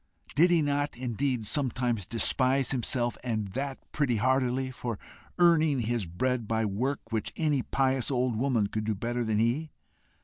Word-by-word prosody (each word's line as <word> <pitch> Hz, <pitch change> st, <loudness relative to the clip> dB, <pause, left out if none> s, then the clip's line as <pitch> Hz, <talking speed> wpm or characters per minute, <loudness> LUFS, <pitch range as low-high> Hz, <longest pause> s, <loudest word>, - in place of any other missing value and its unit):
Did 170 Hz, +5 st, +5 dB
he 170 Hz, -3 st, +3 dB
not, 145 Hz, -1 st, -1 dB
indeed, 125 Hz, -1 st, -1 dB
sometimes 120 Hz, -5 st, 0 dB
despise 130 Hz, +3 st, +3 dB
himself, 120 Hz, -1 st, -1 dB
and 110 Hz, -5 st, -2 dB
that 135 Hz, +6 st, -3 dB
pretty 140 Hz, -6 st, +1 dB
heartily, 130 Hz, +2 st, +1 dB
for 120 Hz, -3 st, -4 dB, 0.4 s
earning 160 Hz, -6 st, +4 dB
his 115 Hz, -4 st, -1 dB
bread 120 Hz, +7 st, -1 dB
by 110 Hz, 0 st, 0 dB
work 115 Hz, +4 st, -2 dB
which 110 Hz, -2 st, -2 dB
any 150 Hz, -4 st, +1 dB
pious 130 Hz, -1 st, 0 dB
old 125 Hz, -3 st, 0 dB
woman 120 Hz, -2 st, +1 dB
could 110 Hz, +1 st, -3 dB
do 110 Hz, -1 st, 0 dB
better 120 Hz, +4 st, -2 dB
than 110 Hz, -2 st, 0 dB
he? 120 Hz, +8 st, +1 dB
125 Hz, 160 wpm, -28 LUFS, 115-135 Hz, 0.4 s, Did